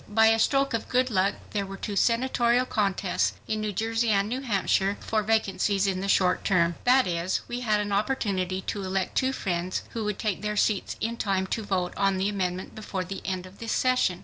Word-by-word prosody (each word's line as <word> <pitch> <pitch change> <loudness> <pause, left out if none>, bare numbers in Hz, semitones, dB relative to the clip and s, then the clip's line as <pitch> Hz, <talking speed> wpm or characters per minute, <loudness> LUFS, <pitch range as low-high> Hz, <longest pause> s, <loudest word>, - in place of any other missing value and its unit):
By 220 +1 +5
a 225 0 +3
stroke 275 +2 +2
of 230 - -2
good 255 0 +2
luck 195 0 +2 0.2
there 205 -2 -1
were 195 0 -7
two 205 +1 -4
senatorial 240 +2 +2
contests—in 205 +1 -1
New 215 -1 -1
Jersey 225 +3 0
and 200 -1 +2
New 250 +4 -3
Hampshire—for 205 -2 0
vacancies 205 -2 +1
in 190 -2 0
the 195 - -3
short 185 -2 +2
term. 170 -3 +2
That 255 +1 +5
is, 175 +1 -1
we 240 - -4
had 215 -4 +1
an 205 0 -2
opportunity 200 -4 0
to 205 +1 -4
elect 190 0 -2
two 260 0 +2
friends 185 -6 -2
who 230 - -3
would 210 -1 -2
take 210 -4 -2
their 210 0 -2
seats 205 -1 +1
in 230 +1 -2
time 195 -3 0
to 225 - -1
vote 185 -4 -1
on 195 -1 +1
the 190 +2 +1
amendment 185 -2 -3
before 200 -3 -4
the 190 +2 -6
end 185 -1 -3
of 185 +1 -14
this 230 -1 -3
session. 250 -8 +2
205 Hz, 205 wpm, -27 LUFS, 190-225 Hz, 0.2 s, By